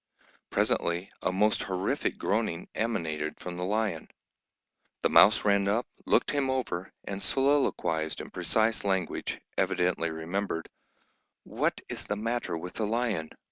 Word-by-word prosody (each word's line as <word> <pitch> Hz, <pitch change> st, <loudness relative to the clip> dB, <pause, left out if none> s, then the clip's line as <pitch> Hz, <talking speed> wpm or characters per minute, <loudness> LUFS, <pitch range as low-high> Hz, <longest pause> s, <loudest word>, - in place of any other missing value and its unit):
Presently 85 Hz, +2 st, +1 dB
a -, -, +1 dB
most 105 Hz, +3 st, +2 dB
horrific 95 Hz, 0 st, -1 dB
groaning 100 Hz, -5 st, -1 dB
emanated 80 Hz, -9 st, -2 dB
from 90 Hz, -1 st, -6 dB
the 90 Hz, -, -3 dB
lion. 105 Hz, -4 st, -1 dB, 0.9 s
The -, -, +3 dB
mouse 110 Hz, +1 st, +7 dB
ran 100 Hz, -1 st, +3 dB
up, 110 Hz, +5 st, +2 dB, 0.2 s
looked -, -, +3 dB
him 140 Hz, -2 st, +1 dB
over, 105 Hz, -9 st, -2 dB
and 100 Hz, 0 st, -5 dB
soliloquised 135 Hz, -, +1 dB
in -, -, -8 dB
precise 110 Hz, -1 st, +1 dB
language, 95 Hz, -4 st, -1 dB, 0.2 s
evidently 90 Hz, -2 st, +1 dB
remembered, 80 Hz, +2 st, -3 dB, 0.7 s
"What -, -, -1 dB
is -, -, -3 dB
the 105 Hz, -, 0 dB
matter 115 Hz, -4 st, -2 dB
with 90 Hz, +2 st, -7 dB
the 110 Hz, -, -1 dB
lion? 110 Hz, -8 st, 0 dB
100 Hz, 135 wpm, -29 LUFS, 85-110 Hz, 0.9 s, mouse